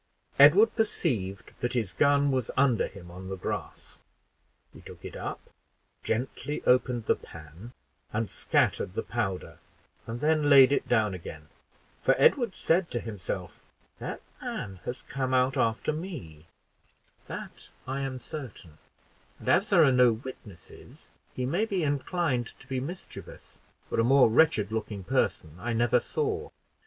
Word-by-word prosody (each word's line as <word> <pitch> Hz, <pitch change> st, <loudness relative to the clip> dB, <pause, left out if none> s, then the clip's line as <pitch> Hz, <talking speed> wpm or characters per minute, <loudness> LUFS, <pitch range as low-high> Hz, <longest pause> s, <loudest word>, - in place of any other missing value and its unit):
Edward 180 Hz, +11 st, +7 dB
perceived 120 Hz, -, -1 dB
that 120 Hz, 0 st, -1 dB
his 110 Hz, -7 st, -1 dB
gun 140 Hz, -1 st, +3 dB
was 130 Hz, -3 st, -1 dB
under 130 Hz, -5 st, +3 dB
him 90 Hz, -3 st, -12 dB
on 95 Hz, +2 st, -9 dB
the 95 Hz, -, -3 dB
grass, -, -, -6 dB, 0.7 s
he -, -, -13 dB
took -, -, -12 dB
it -, -, -7 dB
up, -, -, -5 dB, 0.6 s
gently 130 Hz, +5 st, -3 dB
opened 125 Hz, -2 st, +2 dB
the -, -, +3 dB
pan 80 Hz, -, -12 dB, 0.4 s
and 110 Hz, +1 st, -1 dB
scattered 90 Hz, -, 0 dB
the -, -, -1 dB
powder, 100 Hz, -6 st, -3 dB, 0.5 s
and 115 Hz, +1 st, -4 dB
then 150 Hz, 0 st, +2 dB
laid 135 Hz, -2 st, +8 dB
it 140 Hz, -, 0 dB
down 110 Hz, -4 st, +2 dB
again 80 Hz, -4 st, -9 dB, 0.5 s
for -, -, +4 dB
Edward 240 Hz, -8 st, +4 dB
said 170 Hz, +1 st, +1 dB
to 120 Hz, -, -2 dB
himself, 105 Hz, -5 st, -6 dB, 0.4 s
"That -, -, -5 dB, 0.2 s
man 95 Hz, -2 st, -5 dB
has 125 Hz, -, -5 dB
come 130 Hz, -1 st, -2 dB
out 130 Hz, +1 st, +3 dB
after 115 Hz, +6 st, +1 dB
me, 115 Hz, -, -7 dB, 0.8 s
that -, -, -8 dB, 0.2 s
I 135 Hz, +1 st, -3 dB
am 135 Hz, -1 st, -3 dB
certain; 120 Hz, -, -9 dB, 0.6 s
and -, -, -5 dB
as -, -, +3 dB
there 165 Hz, -, +6 dB
are 140 Hz, -, +5 dB
no 125 Hz, -2 st, +5 dB
witnesses, 110 Hz, -6 st, -11 dB, 0.2 s
he 125 Hz, -, -2 dB
may 175 Hz, -, +1 dB
be 195 Hz, -6 st, -1 dB
inclined 145 Hz, -3 st, -1 dB
to -, -, -15 dB
be 130 Hz, -1 st, -2 dB
mischievous, 165 Hz, +8 st, -9 dB, 0.3 s
for -, -, -2 dB
a -, -, +4 dB
more 130 Hz, -1 st, +5 dB
wretched 110 Hz, -6 st, +3 dB
looking 105 Hz, -3 st, -4 dB
person 90 Hz, -, -1 dB
I 120 Hz, +5 st, -2 dB
never 120 Hz, +1 st, +3 dB
saw. 435 Hz, -, -2 dB
125 Hz, 150 wpm, -28 LUFS, 105-145 Hz, 0.8 s, laid